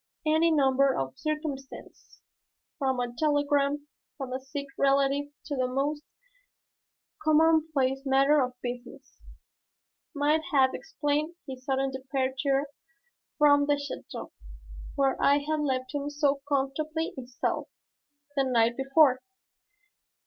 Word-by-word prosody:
Any 315 +2 +3
number 275 -3 +3
of 135 0 -3
circumstances, 300 - -6 0.6
from 265 -3 0
a 245 -1 -2
telegram 290 -1 +1 0.3
from 265 -3 -5
a 260 - -2
sick 280 +2 -6
relative 275 +1 +2 0.2
to 290 - -3
the 255 -1 0
most 280 +4 -1 1.2
commonplace 310 -4 +3
matter 275 +2 +4
of 250 -1 -3
business, 245 +2 -8 0.9
might 295 +2 +2
have 265 -3 +4
explained 305 -3 -2
his 260 -1 -8
sudden 270 0 0
departure 265 +1 -1 0.7
from 285 -1 +5
the 290 - +4
château 285 0 -7 0.6
where 275 -2 +1
I 280 +1 +5
had 310 0 0
left 260 -2 -2
him 290 0 -2
so 290 -1 +1
comfortably 305 +4 -1
installed 250 -1 -3 0.7
the 275 - +2
night 235 -2 +2
before. 270 0 +4
275 Hz, 110 wpm, -28 LUFS, 265-295 Hz, 1.2 s, from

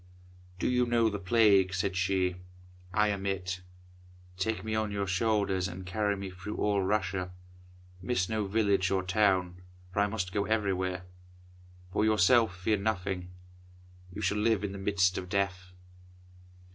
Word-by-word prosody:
"Do - - -1
you 125 -1 +2
know 115 -2 +3
the 100 - -3
Plague?" 100 -2 +4
said 95 +1 -1
she. 90 -1 +1 0.5
"I 105 +1 +3
am 100 -1 -2
it. 90 -2 -2 0.7
Take 110 +4 -2
me 110 0 -3
on 110 -1 0
your 100 -1 -1
shoulders 95 -1 +1
and 90 +1 -8
carry 100 +1 0
me 95 -1 -6
through 95 +3 -7
all 105 -1 +1
Russia. 95 -2 -1 0.7
Miss 95 -2 0
no 110 -2 -1
village 100 -3 +2
or 95 -1 +1
town, 90 -2 +1 0.3
for - - 0
I 100 - +4
must 100 -4 -3
go 100 +1 0
everywhere. 95 -4 -1 0.9
For 105 - +2
yourself 110 -1 +4
fear 105 +3 +1
nothing. 95 -3 -2 0.8
You 105 +4 -6
shall 105 +3 +1
live 110 -2 +2
in 100 - -2
the 100 - -7
midst 95 -2 +2
of 90 - -8
death." 95 -1 -1
100 Hz, 155 wpm, -30 LUFS, 95-105 Hz, 0.9 s, Plague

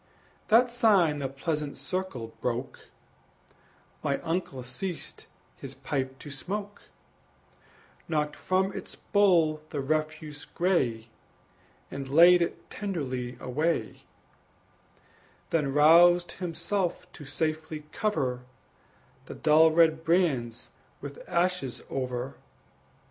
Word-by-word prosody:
That 240 +3 +5
sign 195 -11 +3
the 135 - -1
pleasant 150 +1 -3
circle 180 -12 -4
broke 125 +2 -4 1.1
My 140 - 0
uncle 165 -6 -3
ceased 155 +8 -6 0.3
his - - -9
pipe 130 -2 -3
to 145 - -10
smoke, 200 +9 -5 1.3
Knocked 150 -2 -1
from 190 +1 0
its - - -7
bowl 170 -7 +3
the 145 - -4
refuse 155 +1 -2
gray, 125 -11 0 0.8
And 135 -1 -6
laid 175 +5 +7
it 170 - -3
tenderly 130 - -4
away, 150 +7 -1 1.5
Then 150 -4 +1
roused 170 +4 +6
himself 180 +1 -2
to 150 - -11
safely 155 +1 -3
cover 135 -13 -1 0.9
The - - -7
dull 160 +1 +5
red 160 0 +3
brands 145 -10 0 0.3
with - - -8
ashes 170 -9 0
over. 130 0 -3
155 Hz, 100 wpm, -28 LUFS, 135-175 Hz, 1.5 s, laid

